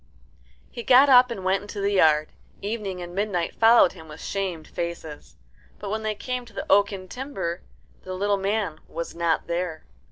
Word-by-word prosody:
He 240 Hz, -, -6 dB
got 260 Hz, +4 st, +6 dB
up 250 Hz, -1 st, +7 dB
and 195 Hz, -6 st, -6 dB
went 190 Hz, +1 st, +2 dB
into 205 Hz, +1 st, -8 dB
the 200 Hz, 0 st, 0 dB
yard. 155 Hz, -5 st, +4 dB, 0.3 s
Evening 200 Hz, -4 st, -4 dB
and 175 Hz, 0 st, -9 dB
Midnight 195 Hz, -3 st, -1 dB
followed 225 Hz, -4 st, +6 dB
him 160 Hz, -3 st, -13 dB
with 150 Hz, -, -11 dB
shamed 185 Hz, -5 st, -4 dB
faces. 170 Hz, -3 st, -6 dB, 0.4 s
But 200 Hz, -1 st, -6 dB
when 220 Hz, +1 st, -2 dB
they 215 Hz, -1 st, -2 dB
came 250 Hz, +4 st, -4 dB
to 230 Hz, -, -17 dB
the -, -, -5 dB
oaken 200 Hz, -1 st, +2 dB
timber 195 Hz, -9 st, -5 dB, 0.4 s
the 185 Hz, 0 st, -6 dB
little 200 Hz, +1 st, +1 dB
man 195 Hz, -5 st, -1 dB
was 170 Hz, -, -6 dB
not 170 Hz, -1 st, 0 dB
there. 170 Hz, -2 st, -3 dB
195 Hz, 180 wpm, -25 LUFS, 170-215 Hz, 0.4 s, up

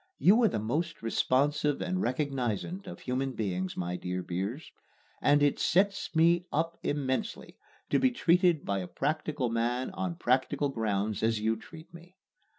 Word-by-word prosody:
You 215 Hz, +6 st, +5 dB
are 230 Hz, -, +6 dB
the -, -, -1 dB
most 150 Hz, +11 st, -2 dB
responsive 145 Hz, +5 st, +1 dB
and 185 Hz, 0 st, -1 dB
recognizant 135 Hz, -, -2 dB
of 180 Hz, -, -8 dB
human 130 Hz, +1 st, -2 dB
beings, 95 Hz, -5 st, -3 dB
my 90 Hz, 0 st, -2 dB
dear 90 Hz, 0 st, -4 dB
Beers, 100 Hz, -, -4 dB, 0.5 s
and 145 Hz, 0 st, +4 dB
it 145 Hz, -, +2 dB
"sets 200 Hz, 0 st, +1 dB
me 170 Hz, +2 st, +4 dB
up 165 Hz, +2 st, -1 dB
immensely" 145 Hz, +9 st, -3 dB, 0.3 s
to -, -, +4 dB
be 260 Hz, -, +4 dB
treated 175 Hz, -, +3 dB
by 100 Hz, -1 st, 0 dB
a 90 Hz, -, -5 dB
practical 150 Hz, -, -1 dB
man 120 Hz, +4 st, -1 dB
on 190 Hz, -2 st, -3 dB
practical 135 Hz, 0 st, +1 dB
grounds 105 Hz, -4 st, -1 dB
as 115 Hz, -1 st, +1 dB
you 110 Hz, +1 st, +1 dB
treat 160 Hz, +9 st, -13 dB
me. 175 Hz, +2 st, -14 dB
140 Hz, 155 wpm, -30 LUFS, 115-170 Hz, 0.5 s, are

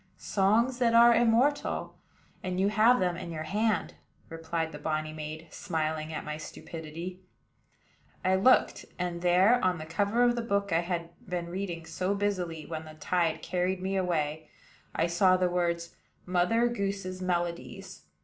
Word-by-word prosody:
"Songs 225 Hz, +6 st, +2 dB
that 230 Hz, -2 st, +3 dB
are 235 Hz, 0 st, +8 dB
immortal; 240 Hz, +5 st, +2 dB, 0.5 s
and 185 Hz, 0 st, -3 dB
you 195 Hz, +1 st, +3 dB
have 220 Hz, +4 st, +5 dB
them 180 Hz, -1 st, +1 dB
in 175 Hz, -, -6 dB
your 155 Hz, -2 st, -4 dB
hand," 210 Hz, +6 st, 0 dB, 0.4 s
replied 165 Hz, 0 st, -3 dB
the -, -, -8 dB
bonny 155 Hz, 0 st, -2 dB
maid, 155 Hz, +1 st, -6 dB
smiling 155 Hz, 0 st, -2 dB
at 155 Hz, -, -5 dB
my 150 Hz, 0 st, -4 dB
stupidity. 160 Hz, +3 st, -8 dB, 1.1 s
I 185 Hz, -, +3 dB
looked; 195 Hz, +8 st, +4 dB
and 175 Hz, -1 st, -3 dB
there, 185 Hz, +8 st, +4 dB
on 185 Hz, -1 st, +2 dB
the 155 Hz, -, -7 dB
cover 200 Hz, +8 st, +1 dB
of 240 Hz, 0 st, +4 dB
the 240 Hz, -, -1 dB
book 200 Hz, -4 st, -1 dB
I 165 Hz, -, +4 dB
had 170 Hz, -1 st, -3 dB, 0.2 s
been 175 Hz, -1 st, -3 dB
reading 175 Hz, -2 st, -4 dB
so 185 Hz, +4 st, -1 dB
busily 180 Hz, -6 st, -2 dB
when 160 Hz, -1 st, -6 dB
the 155 Hz, 0 st, -11 dB
tide 165 Hz, +1 st, 0 dB
carried 180 Hz, +1 st, -1 dB
me 190 Hz, +1 st, -2 dB
away, 155 Hz, -4 st, -1 dB, 0.5 s
I 165 Hz, -, +2 dB
saw 185 Hz, +2 st, +4 dB
the 180 Hz, -1 st, +1 dB
words 170 Hz, -1 st, -1 dB, 0.3 s
"Mother 185 Hz, +7 st, +2 dB
Goose's 195 Hz, -4 st, -3 dB
Melodies." 170 Hz, -8 st, -3 dB
180 Hz, 160 wpm, -29 LUFS, 165-200 Hz, 1.1 s, are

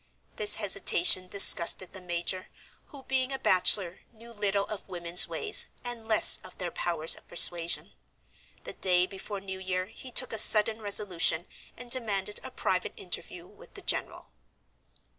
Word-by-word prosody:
This 210 Hz, -1 st, +3 dB
hesitation 185 Hz, -3 st, +2 dB
disgusted 185 Hz, -1 st, +5 dB
the 190 Hz, -, -10 dB
major, 175 Hz, +1 st, -5 dB, 0.4 s
who, 275 Hz, -2 st, -15 dB
being 265 Hz, 0 st, -3 dB
a 270 Hz, -, -4 dB
bachelor, 185 Hz, -3 st, +2 dB
knew 235 Hz, +1 st, -16 dB
little 200 Hz, -2 st, -2 dB
of 210 Hz, -2 st, -10 dB
women's 175 Hz, -1 st, +3 dB
ways, 425 Hz, -1 st, 0 dB, 0.2 s
and 240 Hz, -2 st, -8 dB
less 220 Hz, -2 st, +6 dB
of -, -, -15 dB
their 180 Hz, -2 st, -6 dB
powers 165 Hz, -2 st, 0 dB
of -, -, -19 dB
persuasion. 170 Hz, -1 st, 0 dB, 0.7 s
The -, -, -8 dB
day 180 Hz, -1 st, +1 dB
before 195 Hz, +1 st, -9 dB
New 190 Hz, -1 st, -9 dB
Year 185 Hz, -1 st, -4 dB
he 225 Hz, +5 st, -12 dB
took -, -, 0 dB
a 220 Hz, -, +1 dB
sudden 220 Hz, +1 st, +5 dB
resolution, 185 Hz, -5 st, -2 dB, 0.3 s
and 245 Hz, 0 st, -13 dB
demanded 210 Hz, -5 st, -3 dB
a 260 Hz, -, -9 dB
private 185 Hz, -7 st, -4 dB
interview 175 Hz, -1 st, -6 dB
with -, -, -19 dB
the -, -, -11 dB
general. -, -, -4 dB
195 Hz, 155 wpm, -27 LUFS, 180-220 Hz, 0.7 s, less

